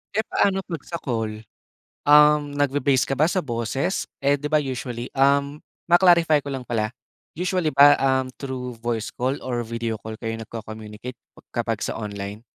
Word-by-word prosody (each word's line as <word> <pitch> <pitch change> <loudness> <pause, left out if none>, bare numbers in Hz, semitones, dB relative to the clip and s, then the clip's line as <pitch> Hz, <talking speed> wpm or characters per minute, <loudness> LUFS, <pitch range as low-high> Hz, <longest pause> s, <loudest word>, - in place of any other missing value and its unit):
Eh, 220 - +2
paano 195 -1 +1
'pag 165 -6 -6
sa 170 - -4
call? 110 -3 -3 0.6
Um, 150 0 +6
nagbi-base 140 -2 +2
ka - - -2
ba 155 - +4
sa 185 0 0
boses, 135 +6 -2 0.2
eh, 140 +1 +3
'di 150 - -4
ba 155 -1 +3
usually 125 -3 -5
um, 140 +2 +2 0.3
ma-clarify 170 -4 +5
ko 140 - -7
lang 130 -2 -5
pala, 110 -3 -1 0.4
usually 180 -1 0
ba, 145 +1 +7
um, 130 -1 +1
through 125 -3 -5
voice 115 -2 -2
call 130 +3 -1
or 120 -2 -2
video 115 -1 -3
call 110 +1 -8
kayo 115 -1 -4
nag-co-communicate 110 +1 -8 0.4
kapag - - -2
sa - - -3
online? 100 -1 -6
130 Hz, 165 wpm, -23 LUFS, 115-150 Hz, 0.6 s, ba